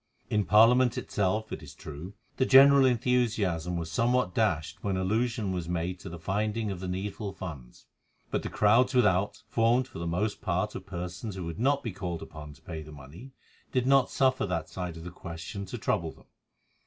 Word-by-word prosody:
In 105 -2 +2
Parliament 120 +3 +5
itself, 105 +2 -1
it - - -5
is - - -11
true, 80 +6 -9 0.2
the 130 - +3
general 135 +1 +8
enthusiasm 110 -9 +1
was 80 -1 -4
somewhat 120 +2 +1
dashed 85 -9 0
when 100 -2 0
allusion 110 +2 0
was 90 -2 -3
made 90 +1 -2
to 90 - -8
the 85 - -7
finding 105 +5 -1
of 95 - -5
the 95 - -5
needful 100 +2 -4
funds; 70 -11 -9 0.5
but - - 0
the - - -5
crowds 115 +5 +3
without, 105 -5 +2
formed 120 +3 +2
for 125 - -9
the 85 - -3
most 100 +5 -1
part 95 +1 -1
of 95 - -8
persons 90 +2 -5
who 95 -2 -5
would 85 0 -6
not 140 +3 +2
be 115 - -3
called 90 -3 -5
upon 75 -1 -10
to - - -21
pay 80 - -6
the 75 0 -11
money, 75 - -12 0.4
did 125 -1 +1
not 135 -1 +4
suffer 130 -5 +2
that 85 -4 -2
side 90 -3 -5
of 80 - -9
the 90 - -7
question 85 +3 -7
to - - -5
trouble - - -1
them. - - -20
95 Hz, 195 wpm, -29 LUFS, 85-115 Hz, 0.5 s, general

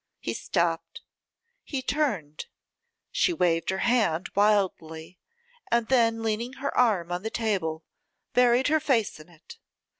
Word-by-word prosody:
He - - -4
stopped, - - -2 0.6
he 270 -3 -4
turned, 210 - -2 0.6
she - - +2
waved 165 - +1
her 190 - 0
hand 210 -8 +1
wildly, 185 -5 0 0.5
and 235 -1 +1
then 230 -3 +2
leaning 225 +3 -2
her 275 +1 -4
arm 200 -9 +2
on 175 0 -2
the 220 - -3
table, 185 -9 -2 0.5
buried 245 +2 +4
her 315 +1 +3
face 245 - 0
in 155 +3 -14
it. 165 -2 -15
220 Hz, 130 wpm, -26 LUFS, 175-250 Hz, 0.6 s, buried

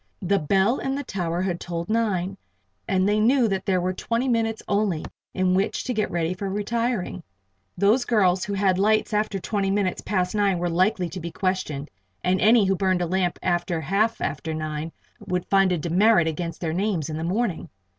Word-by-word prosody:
The 200 +2 +2
bell 195 - +2
in 270 0 -2
the 285 - -3
tower 175 -4 -2
had 180 -2 -2
tolled 170 -1 -4
nine, 200 -4 0 0.5
and 190 0 +2
they 210 +1 +2
knew 240 +2 +4
that 195 -1 -2
there 185 -2 +2
were 180 +1 -1
twenty 235 +6 -1
minutes 225 -2 0
only 200 -6 0 0.3
in 185 -1 +2
which 190 +2 0
to 250 - -2
get 215 -2 0
ready 170 0 -1
for 195 +1 -4
retiring. 210 -1 -2 0.6
Those 215 +6 +3
girls 190 -6 +2
who 205 - -4
had 190 -2 +2
lights 215 +2 +2
after 210 -1 0
twenty 195 +1 -1
minutes 195 -2 0
past 185 -2 -1
nine 200 -3 +2
were 175 0 -1
likely 185 +1 +1
to 180 +4 -6
be 170 0 -5
questioned, 165 -6 -2 0.3
and 185 +1 +1
any 220 +1 +5
who 195 0 +2
burned 185 -1 +1
a - - 0
lamp 180 0 0
after 175 -1 0
half 200 +9 0
after 160 -1 -3
nine 155 +1 -4 0.4
would 180 -1 -1
find 195 -1 +4
a 180 - +1
demerit 175 +2 +3
against 165 +1 -4
their 160 -2 -1
names 185 -4 -1
in 155 - -4
the 160 - -4
morning. 190 +1 -1
190 Hz, 195 wpm, -24 LUFS, 175-210 Hz, 0.6 s, any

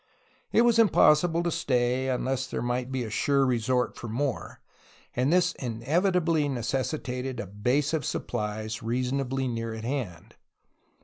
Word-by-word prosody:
It 230 - +5
was 235 -1 +4
impossible 170 -5 +4
to 170 - 0
stay, 130 -4 0
unless 130 0 -1
there - - -3
might 125 +1 -2
be 130 -2 -1
a 110 - -6
sure 140 +4 +2
resort 125 0 0
for 120 - -7
more, 130 +3 -3 0.6
and 130 +4 +1
this 180 0 +3
inevitably 155 - +1
necessitated 130 0 -3
a 120 - -3
base 125 - 0
of 155 -3 0
supplies 110 -1 -3
reasonably 130 +3 -1
near 115 -2 -3
at 110 - -7
hand. 120 - -5
130 Hz, 140 wpm, -27 LUFS, 120-145 Hz, 0.6 s, It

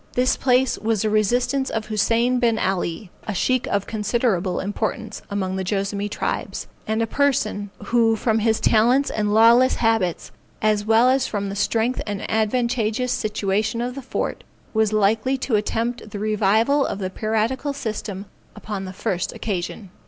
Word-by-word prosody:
This 255 +1 +2
place 255 0 +2
was 220 -1 0
the 215 - 0
residence 245 +6 +1
of 220 -1 -3
Hussein 230 +4 +1
Bin 230 -2 +2
Alley, 185 -1 -2 0.2
a 215 - -2
sheikh 255 +6 +1
of 200 -1 0
considerable 210 -4 0
importance 200 +2 -3
among 190 -2 -2
the 190 - -2
Joassamee 200 +1 -2
tribes, - - -3 0.2
and 220 +1 +1
a - - +1
person 220 -6 0 0.2
who 230 -2 +3
from 220 0 +1
his 220 0 +2
talents 245 +5 +3
and 210 -1 -1
lawless 235 +4 +6
habits, 225 -7 0 0.3
as 215 -1 +1
well 225 +2 +5
as 260 0 +3
from 200 -2 -3
the 195 - -5
strength 225 +4 0
and 205 -1 -3
advantageous 235 +1 0
situation 215 0 -1
of 245 +1 -2
the 275 - -7
fort, 260 - -3 0.3
was 220 -1 +2
likely 215 +5 +2
to 255 -3 -1
attempt 225 +2 -2
the 205 - -6
revival 215 +6 +2
of - - -2
the 185 -2 -4
piratical 225 +7 -1
system 210 -7 -5 0.3
upon 205 -3 -5
the 185 - -7
first 180 -1 -2
occasion. 190 -1 -4
220 Hz, 160 wpm, -22 LUFS, 205-240 Hz, 0.3 s, lawless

